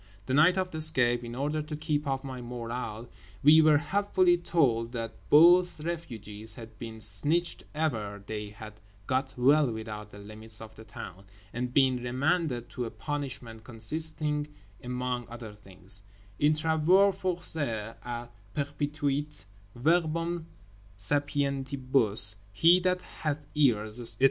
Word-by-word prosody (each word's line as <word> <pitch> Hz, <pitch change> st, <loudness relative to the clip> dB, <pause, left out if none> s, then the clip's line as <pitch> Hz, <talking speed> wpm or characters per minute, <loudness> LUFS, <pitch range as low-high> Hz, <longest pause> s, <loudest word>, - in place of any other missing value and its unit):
The 130 Hz, -, -2 dB
night 165 Hz, +6 st, +5 dB
of 185 Hz, -1 st, -1 dB
the 160 Hz, -, -5 dB
escape—in 120 Hz, -6 st, +2 dB
order 150 Hz, +4 st, -1 dB
to 150 Hz, +1 st, -6 dB
keep 150 Hz, -1 st, -2 dB
up 135 Hz, 0 st, -2 dB
our 130 Hz, -2 st, -6 dB
morale—we 120 Hz, +2 st, 0 dB
were 155 Hz, -1 st, +6 dB
helpfully 185 Hz, +1 st, +2 dB
told 130 Hz, -9 st, +1 dB
that 115 Hz, -2 st, -4 dB, 0.2 s
both 175 Hz, +3 st, +6 dB
refugees 110 Hz, -10 st, -6 dB
had 110 Hz, -2 st, -12 dB
been 115 Hz, -1 st, -7 dB
snitched 145 Hz, -, +2 dB
e'er 110 Hz, -10 st, -2 dB
they 105 Hz, -1 st, -5 dB
had 110 Hz, 0 st, -10 dB, 0.3 s
got 130 Hz, +2 st, -1 dB
well 140 Hz, +3 st, +4 dB
without 110 Hz, -1 st, -6 dB
the 105 Hz, -, -13 dB
limits 110 Hz, +1 st, -6 dB
of 110 Hz, 0 st, -10 dB
the 110 Hz, -, -12 dB
town, 100 Hz, -2 st, -10 dB, 0.3 s
and 125 Hz, +1 st, -3 dB
been 130 Hz, -1 st, +3 dB
remanded 130 Hz, 0 st, 0 dB
to 125 Hz, -, -3 dB
a -, -, -4 dB
punishment 130 Hz, -7 st, -5 dB
consisting 150 Hz, +6 st, 0 dB, 0.4 s
among 125 Hz, -1 st, -3 dB
other 115 Hz, -3 st, -8 dB
things, 100 Hz, -1 st, -7 dB, 0.4 s
in 150 Hz, +1 st, +4 dB
travaux 160 Hz, +6 st, +4 dB
forcés 145 Hz, -, -2 dB
à 120 Hz, 0 st, -5 dB, 0.3 s
perpetuité—verbum 145 Hz, -, -2 dB, 0.5 s
sapientibus, 135 Hz, -3 st, +1 dB
he 165 Hz, -, +5 dB
that 180 Hz, 0 st, 0 dB
hath 150 Hz, -4 st, -4 dB
ears, 115 Hz, -6 st, +1 dB
etc. 115 Hz, -, +1 dB
130 Hz, 130 wpm, -29 LUFS, 110-155 Hz, 0.5 s, were